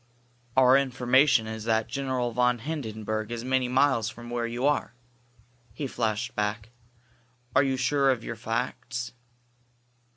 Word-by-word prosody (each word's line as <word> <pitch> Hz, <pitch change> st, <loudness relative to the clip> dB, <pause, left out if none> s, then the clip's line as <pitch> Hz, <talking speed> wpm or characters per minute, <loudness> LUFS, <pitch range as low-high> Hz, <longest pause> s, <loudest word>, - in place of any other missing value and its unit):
"Our 130 Hz, 0 st, +7 dB
information 130 Hz, -1 st, +3 dB
is 110 Hz, 0 st, -6 dB
that 110 Hz, -1 st, +1 dB
General 130 Hz, -3 st, -2 dB
von 125 Hz, +1 st, +2 dB
Hindenburg 110 Hz, -6 st, -4 dB
is 120 Hz, 0 st, -4 dB
many 130 Hz, -1 st, +1 dB
miles 130 Hz, -3 st, +2 dB
from 120 Hz, +1 st, -10 dB
where 120 Hz, -1 st, -1 dB
you 120 Hz, +3 st, -2 dB
are," 145 Hz, -4 st, +1 dB, 0.8 s
he 145 Hz, -, -3 dB
flashed 120 Hz, 0 st, -2 dB
back. 105 Hz, +2 st, -2 dB, 0.8 s
"Are 130 Hz, -, +7 dB
you 135 Hz, -2 st, 0 dB
sure 135 Hz, +2 st, +2 dB
of 125 Hz, -3 st, +1 dB
your -, -, -5 dB
facts?" 120 Hz, +1 st, -3 dB
125 Hz, 135 wpm, -27 LUFS, 115-130 Hz, 0.8 s, Our